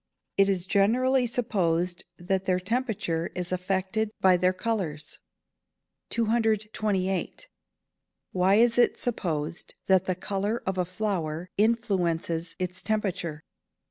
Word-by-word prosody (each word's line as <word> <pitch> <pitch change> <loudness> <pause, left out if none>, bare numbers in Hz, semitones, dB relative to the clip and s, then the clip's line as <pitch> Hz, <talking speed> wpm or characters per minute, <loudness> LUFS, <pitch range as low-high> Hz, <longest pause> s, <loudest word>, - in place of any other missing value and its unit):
_ - - -59 0.3
It 195 0 +4
is 185 -2 +1
generally 245 +7 +3
supposed 180 -7 0
that 190 +2 -1
their 185 -1 +2
temperature 195 -6 -1
is 180 0 -3
affected 190 +4 -1
by 185 -1 +5
their 180 +1 +3
colours. 185 -7 -3 0.9
228. 215 - 0 0.9
_Why 190 +2 +4
is 235 +1 +4
it 240 - +4
supposed 170 -8 -3
that 190 -1 +4
the 185 - 0
colour 200 +5 -2
of 190 -1 -1
a 180 - +2
flower 180 -4 -3
influences 180 -7 0
its 185 0 -3
temperature? 185 -8 -2
190 Hz, 115 wpm, -27 LUFS, 175-220 Hz, 0.9 s, by